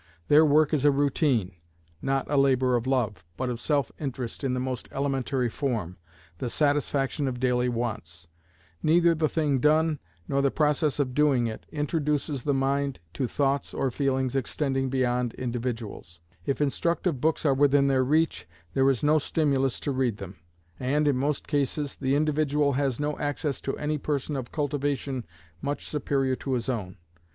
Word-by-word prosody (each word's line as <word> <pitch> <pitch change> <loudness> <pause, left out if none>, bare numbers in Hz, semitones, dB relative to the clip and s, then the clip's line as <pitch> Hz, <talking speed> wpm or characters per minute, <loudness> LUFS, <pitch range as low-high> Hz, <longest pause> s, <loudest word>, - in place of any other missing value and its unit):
Their 150 +2 +7
work 155 0 +4
is 145 -3 +2
a 145 - +6
routine; 140 - +1 0.5
not 135 -1 0
a 145 - -1
labor 130 -2 +3
of 120 +1 -1
love, 110 -9 0
but 130 -1 -1
of 120 - -4
self 145 +2 0
interest 130 -3 -5
in 130 -2 0
the - - -1
most 130 -1 -4
elementary 135 -2 0
form, 115 - -3 0.4
the 125 - -2
satisfaction 145 0 +1
of 125 -2 -3
daily 125 -1 +2
wants; 110 -8 -4 0.5
neither 170 +2 +4
the 155 -1 +1
thing 150 -5 +1
done, 155 +2 +3 0.3
nor 140 - +1
the 140 - +3
process 150 0 +1
of 135 -3 0
doing 140 -4 +3
it, 110 -1 -5
introduces 150 -2 -1
the 145 +3 0
mind 140 0 0
to 130 - -1
thoughts 140 +2 0
or 135 - 0
feelings 130 -1 0
extending 135 0 -1
beyond 125 -2 0
individuals; 115 -8 -4 0.3
if 140 - 0
instructive 165 0 0
books 160 +1 +1
are 140 - +5
within 140 0 +4
their 135 -1 +3
reach, 145 - +1 0.3
there 135 0 +4
is 135 -1 0
no 155 +1 +4
stimulus 135 -4 0
to 145 - -1
read 130 -5 0
them; 95 -1 -8 0.4
and, 145 +4 +1
in 145 - +3
most 140 +3 -1
cases, 145 0 -1
the 135 0 0
individual 150 -1 +2
has 135 -2 0
no 150 0 -2
access 145 0 -2
to 135 - -3
any 150 0 -1
person 145 0 -2
of 130 -3 -5
cultivation 140 - -2 0.3
much 145 +1 -3
superior 135 -3 0
to 135 +1 -4
his 120 0 -1
own. 105 -6 -3
135 Hz, 170 wpm, -27 LUFS, 125-145 Hz, 0.5 s, Their